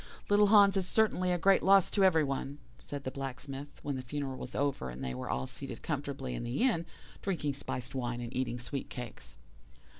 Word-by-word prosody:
"'Little 205 0 +6
Hans 200 -1 +7
is 190 -1 +2
certainly 185 -5 +2
a 175 - +2
great 195 +3 +4
loss 195 -1 +5
to 200 - +3
every 165 -5 +5
one,' 140 0 -3 0.2
said 145 -1 -6
the 130 - -3
Blacksmith, 135 +1 -6
when 140 -2 -2
the - - -3
funeral 135 +1 -4
was - - -7
over, 140 - 0
and 65 +2 -7
they 65 -1 -2
were 65 - -5
all 65 +1 -1
seated - - -6
comfortably 65 - -3
in - - -4
the 120 - -1
inn, 170 -11 +2 0.3
drinking 165 -7 -1
spiced 130 -1 -4
wine 120 -2 -2
and 120 0 -6
eating 125 -2 -1
sweet 130 +3 -5
cakes. 125 -2 -8
140 Hz, 205 wpm, -32 LUFS, 125-180 Hz, 0.3 s, Hans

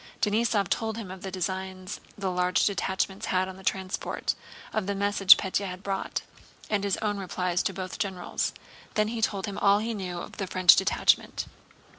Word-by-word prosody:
Denísov 210 -2 +2
told 225 -1 -1
him 205 -5 -6
of 185 -1 -9
the 195 - -4
designs 190 +1 -4 0.2
the 195 -2 -1
large 180 0 +2
detachments 190 0 -1
had 185 0 +1
on 190 - -7
the 190 - -13
transport, 190 0 -1 0.4
of 215 -3 -1
the 200 - -1
message 200 -1 +6
Pétya 195 +1 -1
had 185 +1 -7
brought, 195 -1 -2 0.5
and 205 -2 +1
his 200 -2 +1
own 205 -1 0
replies 180 -1 -1
to - - 0
both 185 0 -6
generals. 185 -3 -2 0.4
Then 215 0 +2
he 230 0 -3
told 200 -3 0
him 200 -2 -5
all 200 0 +5
he 225 +2 -2
knew 185 -4 -4
of - - -8
the 195 - -2
French 185 -1 +7
detachment. 190 - +2
195 Hz, 185 wpm, -28 LUFS, 185-205 Hz, 0.5 s, French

